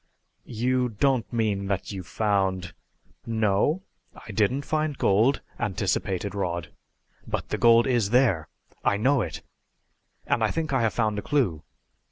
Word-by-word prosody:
"You 125 +2 0
don't 125 +2 0
mean 105 -4 0
that 95 +1 -2
you 95 -2 -5
found 95 -2 -1 0.3
" - - -35 0.2
"No, 145 - +1 0.3
I 110 - -10
didn't 110 +7 +1
find 155 -2 -1
gold," 115 +8 +3 0.2
anticipated 95 0 -1
Rod. 85 -6 -3 0.6
"But - - -3
the - - -2
gold 115 0 +6
is 120 -6 +1
there! 115 -10 +3 0.4
I 100 - +2
know 130 +5 +3
it. 85 -6 -5 0.8
And - - +1
I - - +3
think 160 -3 -2
I 130 - +2
have 115 -2 0
found 110 -3 +1
a - - -4
clue. 100 - 0
110 Hz, 150 wpm, -26 LUFS, 100-130 Hz, 0.8 s, gold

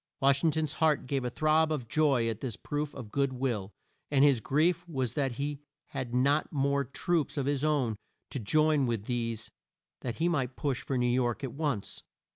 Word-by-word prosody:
Wash 140 0 +3
ing 165 - +5
ton's 155 -1 0
heart 155 -2 +3
gave 135 0 -1
a 125 - -1
throb 155 +3 +2
of 135 -7 -2
joy 135 -3 +2
at 115 -2 -2
this 120 -4 -4
proof 145 0 -4
of 110 -4 -8
good 140 -1 +1
will, 120 -7 -2 0.4
and 140 -1 +4
his 135 -5 +4
grief 165 +7 +2
was 130 -7 -1
that 135 -4 0
he 140 +3 -3 0.3
had 130 -4 -4
not 140 +5 +2
more 140 -1 +1
troops 155 +4 -1
of 140 - 0
his 140 0 0
own 140 -8 +1 0.4
to 135 - -3
join 150 +4 +3
with 115 -4 -2
these 115 -2 -3 0.5
that 120 -3 -4
he 165 - +1
might 130 -7 0
push 140 -4 -1
for 135 - -2
New 125 - +1
York 120 +1 +1
at 130 - -3
once. 140 -9 -3
140 Hz, 200 wpm, -30 LUFS, 125-150 Hz, 0.5 s, ing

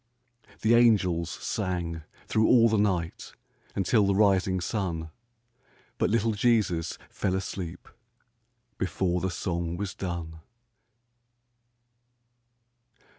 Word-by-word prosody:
The 110 +2 +3
angels 95 -8 +4
sang 85 -5 -3 0.2
thro' 110 - +1
all 115 -2 +6
the 110 -1 +2
night 90 -5 -1 0.4
Until 100 +2 +2
the 100 - +2
rising 95 -2 +3
sun, 85 -5 -3 0.9
But - - +2
little 115 0 +2
Jesus 105 -7 +1
fell 95 -2 -1
asleep 95 -2 -5 0.9
Before 90 -1 0
the 95 - 0
song 85 -1 -3
was 100 -1 -4
done. 85 -3 -5
95 Hz, 95 wpm, -27 LUFS, 85-105 Hz, 0.9 s, all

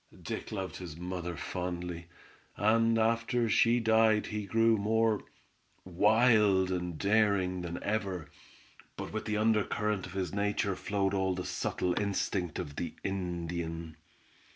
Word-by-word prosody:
Dick - - -5
loved 95 -3 -4
his 85 -4 -8
mother 90 -1 -4
fondly, 90 -1 -4 0.5
and 115 +2 +3
after 115 +1 +1
she 115 +2 +4
died 110 -1 +4
he 105 -1 -4
grew 115 +3 +4
more 110 +1 +1 0.6
wild 105 0 +4
and 90 -2 -3
daring 100 -3 +2
than 85 0 -4
ever, 100 -6 -2 0.7
but - - -6
with 110 - -3
the 105 -1 -1
undercurrent 105 -2 +1
of 90 - -11
his 95 -2 -3
nature 100 -1 0
flowed 100 +1 -1
all 95 -1 +1
the 90 - -4
subtle 90 - -1
instinct 95 -4 -1
of 70 0 -6
the - - -4
Indian. 85 -3 -4
100 Hz, 130 wpm, -31 LUFS, 90-110 Hz, 0.7 s, she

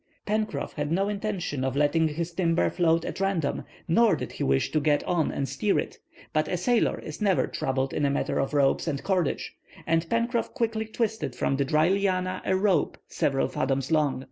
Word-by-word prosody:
Pencroff 215 0 -2
had 145 0 -3
no 195 +4 +1
intention 195 -9 -3
of 130 0 -1
letting 150 +3 +3
his 165 +3 -4
timber 170 -1 +1
float 165 -2 +2
at - - -5
random, 195 -7 0 0.2
nor 225 +6 +4
did - - -5
he - - -4
wish 65 0 +1
to 155 - +2
get 145 0 +2
on 170 -4 0
and 135 - -2
steer 210 +6 0
it. - - -3 0.3
But 155 0 +1
a 180 - -1
sailor 235 +6 +2
is 155 +4 -8
never 195 -3 +3
troubled 135 0 -2
in - - -1
a 140 - +3
matter 140 - -1
of 135 +2 -1
ropes 140 +3 +2
or 145 -3 0
cordage, 180 +2 -1 0.3
and 165 0 +1
Pencroff 235 +2 0
quickly 225 -3 -1
twisted 220 - -2
from 135 - 0
the 140 - +1
dry 155 +3 +3
lianas 185 -1 0
a 190 - +2
rope 190 -4 +1
several 135 -1 +1
fathoms 135 +2 -1
long. 150 -5 +2
165 Hz, 195 wpm, -27 LUFS, 145-200 Hz, 0.3 s, nor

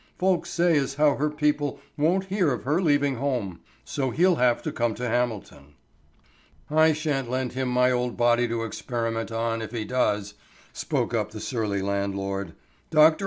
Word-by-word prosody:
"Folks 185 -1 +1
say 170 -2 +3
as 135 0 -3
how 150 0 +4
her 150 +2 +1
people 150 -1 0 0.2
won't 175 +6 +1
hear 190 -5 +1
of 125 - -3
her 150 +7 +1
leaving 145 -5 +2
home. 120 -9 -2 0.3
So 135 -2 -2
he'll 175 +6 +3
have 125 -1 +2
to - - -2
come 115 -2 -1
to 125 +1 -3
Hamilton." 110 - -3 1.0
"I 160 +1 +5
sha'n't 145 -5 -2
lend 130 0 -2
him 130 0 -2
my 125 +1 +3
old 125 -1 -1
body 120 0 +3
to 115 -1 -2
experiment 115 0 -3
on, 115 0 -1
if 110 - -6
he 115 -3 -3
does," 105 -4 0 0.4
spoke - - -2
up 105 -2 0
the 110 0 -8
surly 105 -5 -2
landlord. 100 -2 -2 0.4
"Dr. 155 0 +5
125 Hz, 170 wpm, -25 LUFS, 115-150 Hz, 1.0 s, I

